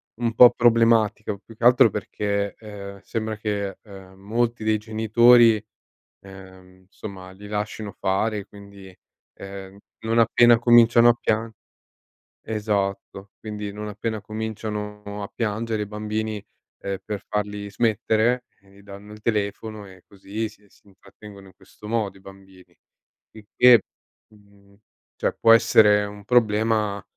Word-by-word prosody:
un 115 -1 -2
po' 120 +1 +8
problematica, 115 -3 +2
più 110 +3 -17
che - - -10
altro 120 -2 +6
perché, 100 0 -3
ehm, 100 -2 -10
sembra 110 -1 -4
che 100 -2 -4 0.4
molti 115 +4 -2
dei 110 0 +1
genitori, 110 +1 +4 0.6
ehm, 95 -1 -15
insomma 95 -1 -11
li 100 +2 -13
lascino 105 0 -5
fare 105 +3 -1
e 100 - -9
quindi, 100 -2 -14 0.4
ehm, 95 0 -10 0.2
non 115 +1 0
appena 120 +1 +5
cominciano 120 0 +6
a - - +5
piang 110 +1 -1 0.9
esatto. 100 -2 -3
Quindi 105 -1 -6
non 105 +1 -7
appena 110 +1 -4
cominciano 105 -1 -6
a 100 - -5
piangere 110 -1 -2
i - - -7
bambini, 105 0 -4 0.4
eh 100 -1 -5
per 105 -2 -6
farli 105 -1 -4
smettere, 115 +3 0 0.2
gli 100 0 -21
danno 100 +1 -12
il 105 - -14
telefono 105 0 -3
e 95 -2 -16
così 100 +3 -6
si 105 -1 -22
si - - -27
intrattengono 100 0 -15
in 95 - -18
questo 100 +2 -15
modo 105 -3 -2
i - - -20
bambini. 95 -2 -17 0.6
Il 110 -1 -15
che, 125 -2 +7 0.5
mhmm, 100 -1 -23 0.4
cioè - - -1
può 115 - +5
essere 105 -2 +5
un 105 0 -10
problema 110 -3 +1
105 Hz, 135 wpm, -23 LUFS, 100-110 Hz, 0.9 s, po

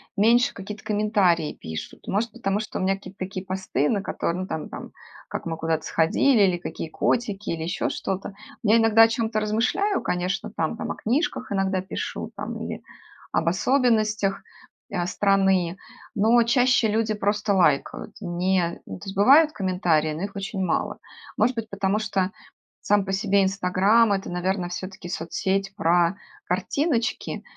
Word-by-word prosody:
меньше 235 +4 +4
какие-то 200 +1 -8
комментарии 205 -7 +1
пишут. 80 0 -8
Может, 215 +3 0
потому 205 -4 -1
что 215 - -5
у - - -1
меня 195 +1 +2
какие-то 195 0 -12
такие 185 0 -5
посты, 185 -7 -1
на 200 -3 0
которы 170 - -2
ну 185 - -4
там 160 -3 -4
там - - -8 0.4
как - - -5
мы 165 -1 -3
куда-то 160 0 -1
сходили 205 +8 +3
или 185 -2 +3
какие 165 -1 -6
котики 210 +1 -1
или 165 -1 -2
еще 170 - -1
что-то. 195 +1 -4 0.3
Я 220 +1 +4
иногда 225 0 +5
о - - +7
чём-то 225 -1 -1
размышляю, 240 - 0
конечно, 180 +3 -2
там - - -1
там - - -4
о - - -4
книжках 255 +1 -1
иногда 195 -1 0
пишу 190 - -5
там - - -5
или - - -5 0.5
об 165 - 0
особенностях, 215 -1 +2 0.5
а, 175 -2 -1
страны, 190 -2 +2 0.4
но 225 +4 +4
чаще 245 -1 +3
люди 220 +1 +1
просто 205 0 0
лайкают. 175 +2 +1
Не, 175 -1 0
ну 95 - -8
то - - -11
есть 195 - -6
бывают 290 +9 +6
комментарии, 180 - +1
но 160 +5 -5
их 200 0 -5
очень 195 0 -3
мало. 185 - -1 0.4
Может 240 +4 +2
быть, 225 -1 -4
потому 200 +1 0
что 195 -3 -1 0.5
сам 205 -1 +2
по 195 - -3
себе 200 0 +2
"Инстаграм"- 195 +4 +3
это, 195 0 -3
наверно, 180 +1 -1
всё-таки 185 0 -7
соцсеть 195 +4 -2
про 175 -1 +2 0.3
картиночки 230 - -1
195 Hz, 160 wpm, -24 LUFS, 180-215 Hz, 0.5 s, о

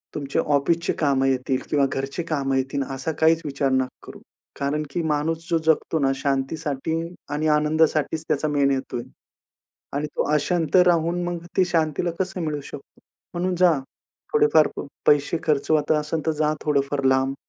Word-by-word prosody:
तुमच्या 140 -2 -1
ऑफिसची 165 +4 +1
कामं 140 -3 +2
येतील 130 0 0
किंवा 145 -2 +3
घरची 135 +5 -3
कामं 140 -5 -1
येतील, 135 +1 -1
असा 135 +4 -3
काहीच 160 +1 +4
विचार 140 -1 -1
नका 130 0 +2 0.2
करू. - - -10 0.4
कारण 145 +2 -1
की 170 - -1
माणूस 160 +2 -1
जो 165 - +3
जगतो 160 0 +2
ना, 135 -2 +2
शांतीसाठी 145 +3 -2 0.3
आणि 150 +2 -1
आनंदासाठीच 155 +1 +1
त्याचा 150 +2 +1
मेन 140 -2 +2
हेतु 135 -2 -2
आहे 120 +2 -7 0.9
आणि 150 +1 -2
तो - - +2
अशांत 160 +1 +1
राहून, 170 +1 +2
मग 175 -1 -4
ती 185 - +5
शांतीला 165 -1 0
कसं 190 -1 -2
मिळू 150 -3 -2
शकतो? 140 - -12 0.3
म्हणून 180 +1 -1
जा, 180 0 +5 0.6
थोडेफार 445 0 +5
प - - -4 0.2
पैसे 145 +2 +3
खर्च 150 -1 0 0.2
असेल, 155 0 0
तर - - +4
जा 155 0 0
थोडंफार 140 -1 0
लांब 130 +1 +2
150 Hz, 160 wpm, -23 LUFS, 140-165 Hz, 0.9 s, ती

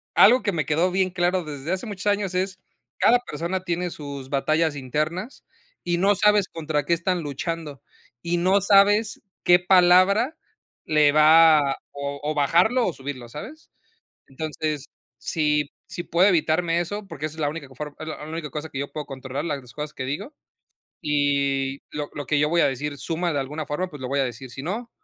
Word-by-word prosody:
algo 250 +4 +6
que 205 - +1
me 155 -5 -1
quedó 165 +4 +1
bien 185 0 +1
claro 180 0 0
desde 150 +1 -6
hace 190 - -3
muchos 205 -1 -5
años 200 -2 +1
es, 185 0 -1 0.4
cada 245 +1 +5
persona 185 -5 -4
tiene 175 0 -2
sus 140 -3 -7
batallas 155 +3 +1
internas 155 - -3 0.4
y 175 0 0
no 200 +2 +4
sabes 210 0 +3
contra 155 -3 -2
qué 170 - +2
están 175 +1 0
luchando 150 -1 -5 0.4
y 170 +1 0
no 190 +3 +3
sabes 205 +2 +4 0.2
qué 175 0 +6
palabra 185 - +4 0.5
le 150 -2 +4
va 155 -2 +6
o 140 0 -5
o 155 +1 -1
bajarlo 180 - +3
o 175 - -2
subirlo, 130 -3 -7
¿sabes?, 280 - -10 0.6
entonces, 150 0 -4 0.3
si 150 +2 0 0.2
si 175 - -5
puedo 175 +3 +3
evitarme 170 -1 +2
eso, 200 +4 -4
porque 150 -4 -6
esa 155 - -10
es - - -11
la 145 - +1
única 155 -2 -7
co 130 - -17
form 150 +2 -6
es 155 - -7
la 155 -1 -6
única 155 -1 -5
cosa 150 +2 -6
que 135 - -6
yo 140 - -3
puedo 150 -1 -5
controlar, 135 0 -5
las 135 -6 -5
cosas 150 0 -6
que 130 - -5
digo, 150 - -5 0.7
y 140 -2 0
lo 150 -1 -5
lo 145 -2 -5
que 145 - +1
yo 150 - +3
voy 170 0 +3
a - - +5
decir 140 +2 -4
suma 170 0 -2
de 145 - -1
alguna 150 +4 -4
forma, 180 +6 -2
pues 150 -5 -11
lo 125 - -4
voy 140 +1 0
a - - +2
decir, 125 +1 -6
si 135 +2 -8
no, 225 +9 -4
155 Hz, 195 wpm, -24 LUFS, 145-180 Hz, 0.7 s, algo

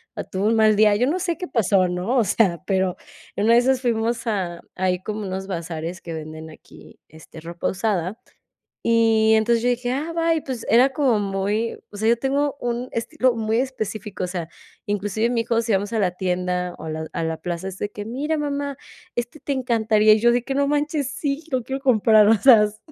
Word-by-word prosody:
o - - -4
tuvo 195 +3 -2
un 225 - +3
mal 215 -1 +4
día, 210 0 +5
yo 245 +5 +1
no 355 +5 0
sé 340 -3 -2
qué 360 - -5
pasó, 195 -5 +2
¿no? 180 +8 -1
O 235 - +4
sea, 180 -4 +1
pero 190 -2 0 0.4
en 205 - 0
una 230 - +5
de 235 - +7
esas 255 +1 +1
fuimos 230 -1 -1
a 185 -6 -2
ahí 185 -1 0
como 215 0 -4
unos 190 -1 -4
bazares 170 -1 -5
que 165 - -7
venden 155 0 -8
aquí, 155 - -16
este, 160 +1 -14
ropa 170 +1 -4
usada. 195 0 -2 0.6
Y 225 -1 +3
entonces 225 +1 +3
yo 245 - +1
dije: 245 0 -1
"Ah, 300 +5 -3
bye", 330 -1 +1
pues 260 -5 -6
era 255 +4 +5
como 265 -7 +2
muy 205 +3 -1
o 205 - -10
sea, 220 +2 0
yo 235 - +4
tengo 280 +3 0
un 245 +1 -3
estilo 255 +1 0
muy 225 0 0
específico. 215 -6 -4
O 180 - 0
sea, 175 -3 -4 0.4
inclusive 205 +2 -1
mi 240 -1 +1
hijo, 230 0 +1
si 225 -1 -1
vamos 205 +3 0
a 225 - 0
la 190 -4 +1
tienda 180 -1 -2
o - - -9
a - - -5
la 160 0 -5
a 165 - -2
la 160 0 -3
plaza, 175 +1 -5
es 190 -1 -6
de 205 - -3
que: 205 0 -7
"Mira, 285 +8 -2
mamá, 285 -1 -3 0.4
este 240 +5 -4
te 285 - -7
encantaría." 220 -5 +3
Y 215 - +4
yo 240 +2 +5
de 240 0 +1
que: 270 - -3
"No 280 0 +1
manches, 295 -1 0
sí, 280 +1 -3
lo 255 -3 -1
quiero 270 +2 -4
comprar", 220 -4 +5
o 225 - +6
sea, 230 -1 +7
s 210 0 -2
220 Hz, 225 wpm, -22 LUFS, 190-250 Hz, 0.6 s, de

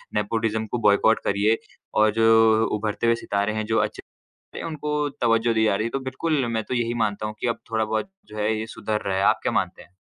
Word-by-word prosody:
Nepotism 110 +1 0
को 120 - 0
boycott 105 +2 +4
करिए 105 +3 +2 0.4
और 110 0 +5
जो 110 0 +5
उभरते 105 +2 -2
हुए 115 - +4
सितारे 100 +1 0
हैं, 110 0 -2
जो 110 +1 0
अच्छे - - -2 0.6
हैं, - - -6
उनको 150 -1 -3 0.2
तवज्जोह 115 0 +3
दी 110 0 +2
जा 105 - +2
रही 110 +3 -1
है। - - -4
तो 135 - -2
बिल्कुल, 140 0 -1
मैं 110 -2 -1
तो - - -5
यही 120 -1 0
मानता 105 0 -2
हूँ 105 0 -5
कि - - -1
अब 115 - -1
थोड़ा-बहुत 110 - -1 0.2
जो 105 - -11
है, 105 +1 +1
ये 110 - -3
सुधर 110 -1 -3
रहा 95 -1 0
है। 95 - +1
आप - - +4
क्या - - 0
मानते - - -1
हैं? 90 - -23
110 Hz, 235 wpm, -24 LUFS, 105-115 Hz, 0.6 s, और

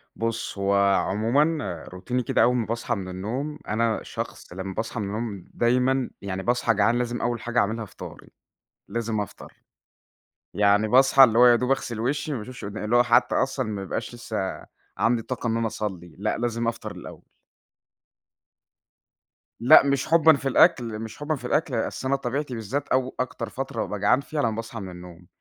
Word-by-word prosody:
بُص 115 -2 -3
هو 100 0 +1 0.2
عمومًا 115 - 0
روتيني 120 +8 -3
كده - - +2
أول 125 - +3
ما 120 -3 0
باصحى 120 +1 -2
من 95 -3 -6
النوم، 125 +11 -4
أنا 110 +1 0
شخص - - -7
لمّا 95 +1 -5
باصحى 115 +4 -4
من 105 - -2
النوم 105 -2 -4
دايمًا 125 +2 +1
يعني 95 -1 -4
باصحى 120 -1 +2
جعان 110 +3 +2
لازم 120 0 -2
أول 120 -1 -1
حاجة 120 0 0
أعملها 110 +2 0
فطاري، - - -11 0.6
لازم 115 -2 -2
أفطر، 105 - -8 1.0
يعني 105 +1 +3
باصحي 135 +3 +6
اللي 115 -2 +5
هو 125 - +8
يا 120 -1 +7
دوب 125 +2 -1
أغسِل 125 -4 -1
وشي 145 +5 -1
ما - - -2
باشوفش 120 0 -8
قدا 105 +1 -5
اللي 115 - +1
هو 120 - +6
حتى 120 +1 +3
أصلًا - - 0
ما 100 -2 -4
يبقاش 95 +5 -4
لسه 110 -5 -4 0.3
عندي 115 0 +2
طاقة 125 +1 -4
إن 115 - 0
أنا 115 -1 0
أصلِّي، 95 -7 -5
لأ، 105 +3 -1
لازم 115 0 -1
أفطر 115 -1 -3
الأول. - - -10 2.4
لأ، 120 - +8
مش 140 -1 0
حُبًا 160 -1 +6
في 140 0 -4
الأكل، 115 -4 +3
مش 110 -1 -7
حُبًا 145 +1 -2
في 125 - -10
الأكل، 155 -3 0
أصل 115 +3 -2
أنا 135 - +2
طبيعتي 135 +1 -3
بالذات 120 +6 -3
أو 130 0 0
أكتر 125 - -3
فترة 130 -4 -4
بابقى 105 - -4
جعان 105 +7 +3
فيها 150 +1 -3
لمّا 115 - +1
باصحى 115 +1 -6
من 95 -3 -7
النوم، 90 -1 -12
115 Hz, 180 wpm, -25 LUFS, 105-125 Hz, 2.4 s, هو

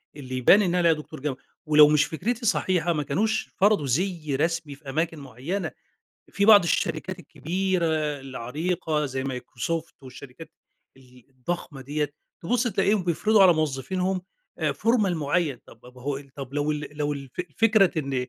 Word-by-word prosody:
اللي 130 -3 -6
يبان 185 +11 +6
إن 180 -3 +1
أنا - - +2
عليَّ 170 -2 +4
دكتور 150 -3 -9
جامعة، 135 -2 -3 0.3
ولو 150 -1 +7
مش 150 0 +4
فكرتي 230 +9 -3
صحيحة 175 -4 +1
ما 150 -1 -1
كانوش 215 +11 -1
فرضوا 205 -6 +3
زِي 155 0 -1
رسمي 160 -1 -1
في 140 -1 -12
أماكن 160 +2 -1
معينة. 140 - -4 0.6
في 200 - 0
بعض 210 -3 +8
الشركات 185 +2 -1
الكبيرة، 175 +3 -2 0.3
العريقة 150 +4 -2
زي 130 0 -4
مايكروسوفت 135 +5 -4
والشركات 130 +4 -11 0.5
ال 125 -2 -19
الضخمة 135 +1 -5
دِيّة 145 +2 -2 0.3
تبُص 240 +7 +1
تلاقيهم 195 -1 +1
بيفرضوا 205 +5 +3
على 180 -2 +8
موظفينهم 180 +6 -1 0.4
آآ، - - 0
formal 225 -4 +2
معين 150 -2 0
طب 115 - -16
ب - - -17
ب 125 - -16
هو 135 +2 -3
ال 140 -1 -11
طب 135 -1 -8
لو 145 +1 0
ال 150 0 -5
لو 145 0 -1
الف 140 -3 -8 0.3
فكرة 215 -7 +4
إن 140 -2 -3
155 Hz, 165 wpm, -25 LUFS, 135-185 Hz, 0.6 s, بعض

